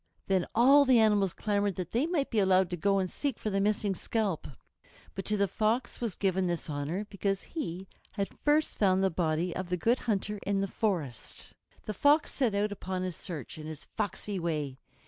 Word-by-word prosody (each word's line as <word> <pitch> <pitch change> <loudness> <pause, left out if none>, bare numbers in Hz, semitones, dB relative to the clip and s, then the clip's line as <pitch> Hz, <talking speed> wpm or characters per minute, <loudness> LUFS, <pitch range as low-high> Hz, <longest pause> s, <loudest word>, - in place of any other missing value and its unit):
Then 190 -2 +1
all 270 +5 +7
the 260 -3 +5
animals 210 -4 +4
clamored 205 0 0
that 180 -2 -5
they 255 +7 +1
might 320 -6 -1
be 225 - +2
allowed 190 -2 +3
to - - 0
go 195 +3 +2
and 190 - +1
seek 280 -5 -2
for 215 - -3
the 195 0 +1
missing 205 -1 +1
scalp. 200 -3 -1 0.7
But 195 - -5
to 210 - 0
the 200 0 +2
Fox 225 +6 -1
was 230 -5 -2
given 190 -2 +1
this 170 -2 -3
honor, 150 +8 -2
because 195 -1 -2
he 190 - -5 0.3
had 200 -2 -3
first 300 +1 +2
found 190 -2 +3
the 190 - +2
body 165 +1 0
of 185 -1 -4
the 180 - 0
Good 235 +8 +2
Hunter 210 0 -1
in 200 0 0
the 195 - 0
forest. 170 - -3 0.3
The 215 - -3
Fox 290 +9 +3
set 245 -7 +1
out 205 +1 +1
upon 185 -2 -4
his 185 -2 -3
search, 155 - -7
in 155 - -7
his 155 -2 -7
foxy 205 -1 -2
way. 150 -6 -2
195 Hz, 205 wpm, -30 LUFS, 180-215 Hz, 0.7 s, all